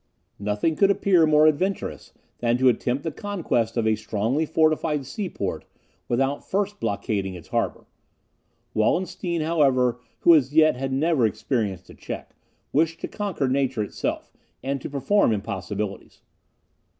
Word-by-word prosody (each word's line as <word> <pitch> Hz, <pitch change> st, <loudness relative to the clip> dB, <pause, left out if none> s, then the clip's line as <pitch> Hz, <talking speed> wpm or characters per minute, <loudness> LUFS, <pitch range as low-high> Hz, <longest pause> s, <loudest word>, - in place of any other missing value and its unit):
Nothing 105 Hz, +10 st, 0 dB
could 195 Hz, +3 st, +4 dB
appear 185 Hz, -4 st, +4 dB
more 155 Hz, 0 st, +5 dB
adventurous 180 Hz, +6 st, 0 dB, 0.3 s
than 120 Hz, 0 st, +2 dB
to 130 Hz, 0 st, +5 dB
attempt 125 Hz, +2 st, 0 dB
the 160 Hz, -, -2 dB
conquest 160 Hz, -, -2 dB
of 115 Hz, -, +1 dB
a 110 Hz, -, +3 dB
strongly 115 Hz, +11 st, -1 dB
fortified 155 Hz, -2 st, +1 dB
seaport 125 Hz, -, -4 dB, 0.4 s
without 135 Hz, +4 st, 0 dB
first 205 Hz, +1 st, -2 dB
blockading 100 Hz, -2 st, -2 dB
its 85 Hz, -, -12 dB
harbour. -, -, -1 dB, 0.9 s
Wallenstein, 170 Hz, -, 0 dB
however, 135 Hz, -7 st, +2 dB, 0.2 s
who 170 Hz, -, +7 dB
as 145 Hz, -2 st, +3 dB
yet 155 Hz, -2 st, +6 dB
had 135 Hz, +1 st, -3 dB
never 135 Hz, -3 st, +2 dB
experienced 100 Hz, -4 st, -2 dB
a -, -, -12 dB
check, -, -, -8 dB, 0.4 s
wished 165 Hz, +3 st, +2 dB
to -, -, -3 dB
conquer 195 Hz, -10 st, -2 dB
nature 130 Hz, -3 st, 0 dB
itself, 105 Hz, -, -4 dB, 0.3 s
and 135 Hz, 0 st, -2 dB
to -, -, -5 dB
perform 145 Hz, -, +2 dB
impossibilities. 100 Hz, -1 st, -5 dB
135 Hz, 140 wpm, -24 LUFS, 115-160 Hz, 0.9 s, who